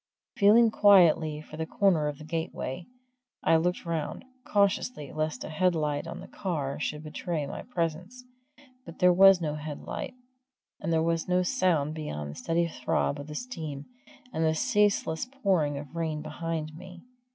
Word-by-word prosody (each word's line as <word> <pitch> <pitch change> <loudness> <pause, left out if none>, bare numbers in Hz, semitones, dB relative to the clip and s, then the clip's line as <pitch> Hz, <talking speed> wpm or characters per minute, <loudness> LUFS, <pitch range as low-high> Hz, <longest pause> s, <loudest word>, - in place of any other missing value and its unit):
Feeling 220 +3 +6
quietly 170 -7 +5
for 155 0 -11
the 160 0 -3
corner 175 -7 +2
of 145 -1 -4
the 155 - -11
gateway, 160 -1 -4 0.6
I - - +4
looked 175 +3 -1
round, 165 - -3 0.2
cautiously, 200 - 0
lest 155 -4 -2
a - - -6
headlight 155 -3 0
on 165 - -7
the - - -10
car 150 -8 -3
should 150 0 -3
betray 155 0 -3
my - - -6
presence. 180 +4 -4 0.6
But 165 - -11
there 180 0 +5
was 195 0 +7
no 150 -3 -1
headlight, 150 - -6 0.6
and 165 - -3
there 160 -1 +2
was 165 0 0
no 180 0 +2
sound 165 -5 +1
beyond 75 - -5
the - - -10
steady 170 - 0
throb 140 0 -1
of 145 - -7
the 150 - -7
steam 155 - -6 0.5
and 160 - 0
the 160 0 +2
ceaseless 205 -3 +1
pouring 190 - 0
of 145 0 -7
the 170 - -4
rain 155 -2 -2
behind 155 0 -4
me. 180 +1 -11
165 Hz, 165 wpm, -28 LUFS, 150-180 Hz, 0.6 s, was